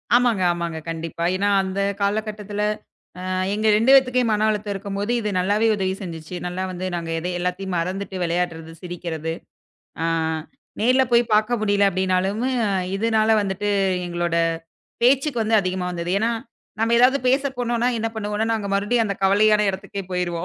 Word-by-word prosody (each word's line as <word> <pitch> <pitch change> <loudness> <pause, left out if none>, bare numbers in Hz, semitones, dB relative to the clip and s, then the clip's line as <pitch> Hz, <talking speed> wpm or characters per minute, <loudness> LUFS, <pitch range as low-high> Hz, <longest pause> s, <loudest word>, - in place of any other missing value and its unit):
ஆமாங்க, 240 -5 +3
ஆமாங்க, 170 -2 -3
கண்டிப்பா. 165 0 -4
ஏன்னா 200 +2 0
அந்தக் 195 +1 -2
காலகட்டத்துல, 210 0 -2 0.6
அ - - -4 0.3
எங்க 215 +1 0
2 230 +5 +4
பேத்துக்குமே 255 -2 +4
மன 215 +1 +2
அழுத்தம் 210 -1 -2
இருக்கும்போது 200 +2 -3
இது 210 - -2
நல்லாவே 205 +4 +2
உதவி 190 -2 -1
செஞ்சுச்சு. 165 -1 -7
நல்லா 180 +1 -3
வந்து 185 +1 -5
நாங்க 165 -1 -4
எதை 175 +2 -3
எல்லாத்தையும் 180 +1 -2
மறந்துட்டு 190 +3 -4
விளையாட்றது, 165 -1 -2
சிரிக்கிறது. 165 -3 -4 0.7
அ - - +1 0.7
நேர்ல 255 +4 +4
போய் 235 0 +6
பார்க்க 220 +3 +2
முடியல 205 -1 +3
அப்டின்னாலும் 190 +3 0 0.5
இதுனால 220 +1 +1
வந்துட்டு 200 0 -2 0.4
எங்களோட 175 -1 -1 0.7
பேச்சுக்கு 265 0 +3
வந்து 220 0 +2
அதிகமா 185 -1 -2
வந்தது. 170 0 -4
ஏன்னா, 225 +3 +1 0.5
நாம்ம 225 +1 +2
ஏதாவது 255 +3 +5
பேசப் 270 0 +1
போனோம்னா 240 0 0
என்ன 225 - -1
பண்ணுவோம்னா 210 +1 -1
நாங்க 215 -3 -2
மறுபடியும் 210 +4 +1
அந்தக் 200 -2 -4
கவலையான 210 +2 +4
இடத்துக்கே 195 +1 -6
போயிருவோம். 175 -1 -2
200 Hz, 150 wpm, -22 LUFS, 180-220 Hz, 0.7 s, போய்